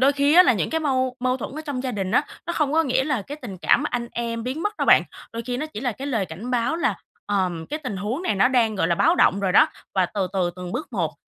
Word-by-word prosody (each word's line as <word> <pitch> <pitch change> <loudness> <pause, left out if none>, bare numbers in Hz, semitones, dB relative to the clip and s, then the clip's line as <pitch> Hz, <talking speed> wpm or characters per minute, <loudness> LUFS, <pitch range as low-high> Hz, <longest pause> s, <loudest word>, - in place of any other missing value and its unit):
đôi 275 +2 +5
khi 285 +2 +2
á, 360 - +10
là 350 - +4
những 215 - -1
cái 320 0 0
mâu 260 -3 0
mâu 255 0 +1
thuẫn 260 - -6
ở - - -3
trong 280 -4 -3
gia 260 - -2
đình 195 -3 -3
á, - - +4 0.2
nó 340 - -2
không 300 -4 0
có 325 +1 +4
nghĩa 265 -2 +1
là 265 -7 -1
cái 285 +9 -8
tình 195 -7 -7
cảm 280 - +3
anh 240 -1 -2
em 230 -1 -3
biến 260 +7 -4
mất 415 +1 -2
đâu - - -1
bạn, - - +7 0.3
đôi 230 0 -4
khi 245 -1 -2
nó 305 - -3
chỉ 265 -8 -8
là 250 -2 -1
cái 270 +6 -7
lời 225 -8 -1
cảnh 185 +10 -7
báo 245 +5 0
là, 340 - 0 0.3
ờm, 185 -5 -1
cái 305 - -4
tình 255 -10 -5
huống 215 - -3
này 365 - 0
nó 200 +6 +4
đang, 235 -4 +2
gọi 190 - +1
là, 170 - +3
báo 325 - +3
động 200 - +3
rồi 190 -2 0
đó - - +6 0.3
và 185 -2 +3
từ 195 0 -2
từ 180 -2 0
từng 180 -1 -6
bước - - -5
một - - -1
250 Hz, 305 wpm, -23 LUFS, 200-285 Hz, 0.3 s, á